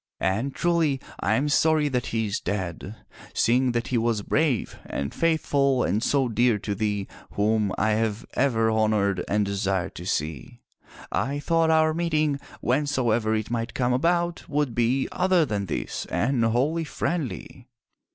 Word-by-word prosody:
And 110 +9 -1
truly 165 -5 +1 0.2
I - - +1
am 140 +3 +1
sorry 155 0 +3
that 125 -3 -1
he 110 -1 -1
is 100 -1 -2
dead, 95 +1 -4 0.4
seeing 125 +2 +3
that 120 0 -2
he 125 - +1
was 115 -2 0
brave 140 -5 0
and 70 0 -4
faithful 140 -5 +2
and 105 +5 0
so 135 +1 +2
dear 120 -1 +2
to 105 0 -3
thee 105 -1 -2 0.3
whom 105 -1 +1
I 110 - +2
have 110 0 -1
ever 115 -4 +2
honored 105 -4 +1
and 105 0 +1
desired 95 -2 -1
to 85 - -8
see. 75 -7 -3 0.5
I 140 +2 -1
thought 165 +2 +2
our 160 0 +4
meeting, 155 -4 0 0.2
whensoever 120 -5 +1
it 110 +1 -3
might 115 0 -3
come 125 -1 +1
about, 170 +5 0
would 145 -4 0
be 120 +3 +1
other 180 -2 +3
than 100 -6 -2
this, - - -4
and 125 -1 +1
wholly 135 +9 +1
friendly." 150 - -4
120 Hz, 155 wpm, -25 LUFS, 105-145 Hz, 0.5 s, our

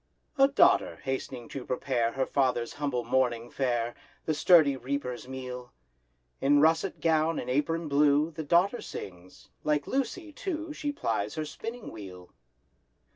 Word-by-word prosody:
A 270 - +8
daughter 280 - +4
hast'ning 130 -2 -4
to 135 - -6
prepare 125 -2 -1
Her 135 -1 0
father's 125 -4 0
humble 140 -4 -2
morning 120 -1 0
fare— 120 -3 -1 0.3
The 155 - +1
sturdy 155 -2 +5
reaper's 125 -1 -4
meal. 125 -1 -7 0.7
In 145 +1 +4
russet 160 +5 +2
gown 160 0 +2
and 125 - -3
apron 165 +4 0
blue, 145 +2 +3
The 160 0 -6
daughter 175 +10 +2
sings; 90 -1 -9
like 150 -1 +1
"Lucy," 310 +5 -2
too, 320 -3 -4
She 295 -1 -3
plies 110 - -2
her 155 - -2
spinning 225 +10 -7
wheel. 90 -4 -10
140 Hz, 140 wpm, -29 LUFS, 125-165 Hz, 0.7 s, A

